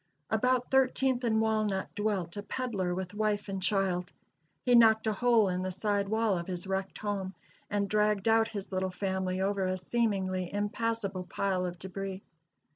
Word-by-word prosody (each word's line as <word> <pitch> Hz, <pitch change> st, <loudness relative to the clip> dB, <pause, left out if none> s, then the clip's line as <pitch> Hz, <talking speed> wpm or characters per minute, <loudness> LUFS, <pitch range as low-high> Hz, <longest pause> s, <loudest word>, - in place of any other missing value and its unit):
About 250 Hz, +3 st, +1 dB
Thirteenth 265 Hz, -1 st, +2 dB
and 220 Hz, -2 st, +2 dB
Walnut 215 Hz, -3 st, 0 dB
dwelt 205 Hz, -5 st, -1 dB
a 205 Hz, -, -4 dB
peddler 205 Hz, -6 st, -2 dB
with 185 Hz, +1 st, -4 dB
wife 210 Hz, -1 st, 0 dB
and 195 Hz, -1 st, -3 dB
child. 185 Hz, -2 st, +1 dB, 0.5 s
He 250 Hz, -, +3 dB
knocked 220 Hz, -2 st, +6 dB
a 220 Hz, -, +1 dB
hole 230 Hz, 0 st, +4 dB
in 180 Hz, 0 st, -1 dB
the 185 Hz, -, -2 dB
side 200 Hz, +1 st, -1 dB
wall 220 Hz, -4 st, +1 dB
of 170 Hz, -, -6 dB
his 180 Hz, -1 st, -4 dB
wrecked 190 Hz, 0 st, -3 dB
home, 195 Hz, -2 st, -3 dB, 0.3 s
and 205 Hz, -1 st, 0 dB
dragged 210 Hz, 0 st, +1 dB
out 225 Hz, 0 st, +4 dB
his 200 Hz, -4 st, -6 dB
little 190 Hz, 0 st, 0 dB
family 190 Hz, 0 st, -2 dB
over 195 Hz, -1 st, 0 dB
a 185 Hz, 0 st, -1 dB
seemingly 185 Hz, -3 st, -1 dB
impassable 205 Hz, -2 st, -2 dB
pile 185 Hz, -1 st, -1 dB
of 175 Hz, 0 st, -6 dB
debris. 190 Hz, +1 st, -6 dB
200 Hz, 170 wpm, -30 LUFS, 185-220 Hz, 0.5 s, knocked